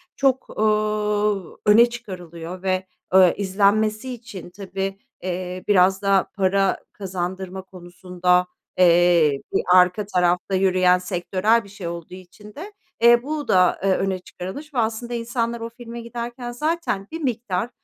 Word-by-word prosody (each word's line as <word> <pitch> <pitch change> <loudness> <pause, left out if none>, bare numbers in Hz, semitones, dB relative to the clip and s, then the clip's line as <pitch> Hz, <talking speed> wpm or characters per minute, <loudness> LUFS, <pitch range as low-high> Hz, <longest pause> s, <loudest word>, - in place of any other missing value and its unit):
çok, 265 -1 +1
ooo, 210 -2 0
öne 230 +3 +6
çıkarılıyor 180 -6 -8
ve, 185 0 -1 0.2
ö 185 -2 +7
izlenmesi 215 +5 +1
için 215 -7 -10
tabii, 195 +1 -5 0.2
eee, 180 0 -4
biraz 190 -1 +4
da 195 -2 +2
para 195 0 +1 0.2
kazandırma 190 0 -5
konusunda, 180 0 -1 0.3
eee, 170 -5 +4
bir - - +2
arka 185 +3 +4
tarafta 180 0 +1
yürüyen 185 -1 +3
sektörel 185 +5 0
bir 200 - -15
şey 195 -3 -7
olduğu 170 0 -7
için 185 +3 -13
de, 400 +8 -8 0.3
eee, 235 +1 +6
bu 300 0 -4
da, 180 -1 +3
e, 195 - +1
öne 190 0 0
çıkarılmış 275 +13 -9
ve - - -5
aslında 230 +2 -2
insanlar 235 0 -2
o 230 - -4
filme 235 0 -9
giderken 240 +1 -6
zaten 300 -7 -2
bir 325 0 -6
miktar, 235 -5 -2
195 Hz, 140 wpm, -22 LUFS, 180-230 Hz, 0.3 s, ö